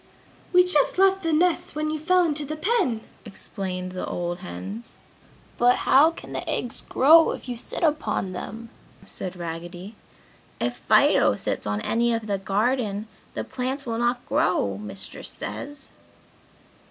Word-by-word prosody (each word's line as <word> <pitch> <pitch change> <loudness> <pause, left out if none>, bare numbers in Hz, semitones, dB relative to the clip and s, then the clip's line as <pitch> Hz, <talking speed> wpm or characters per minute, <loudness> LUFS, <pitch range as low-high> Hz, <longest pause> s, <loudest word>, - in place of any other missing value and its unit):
"We 360 0 +7
just 360 -4 +3
left 385 0 +4
the 330 -2 0
nests 335 +1 +1
when 305 0 -1
you 310 - -2
fell 360 +3 +3
into 300 -2 -1
the 300 +2 -4
pen!" 310 - +1 0.2
explained 190 -3 -5
the 185 - -4
old 175 0 -3
hens. 95 - -8 0.6
"But 245 +1 +5
how 290 +4 +7
can 330 - -10
the - - -4
eggs 245 - -3
grow 320 +5 +7
if - - -9
you 245 - -3
sit 235 - -4
upon 300 - 0
them?" 225 +5 -7 0.4
said 185 -1 -6
Raggedy. 175 +4 -7 0.6
"If - - -1
Fido - - +4
sits - - -2
on 105 0 -1
any 235 - +1
of 225 -1 -4
the 200 -2 -1
garden, 210 +1 0 0.3
the - - -2
plants 260 +2 -3
will 230 -1 -2
not 240 +1 0
grow, 100 - +1
Mistress 105 -2 -7
says!" 275 - -7
235 Hz, 155 wpm, -25 LUFS, 185-305 Hz, 0.6 s, We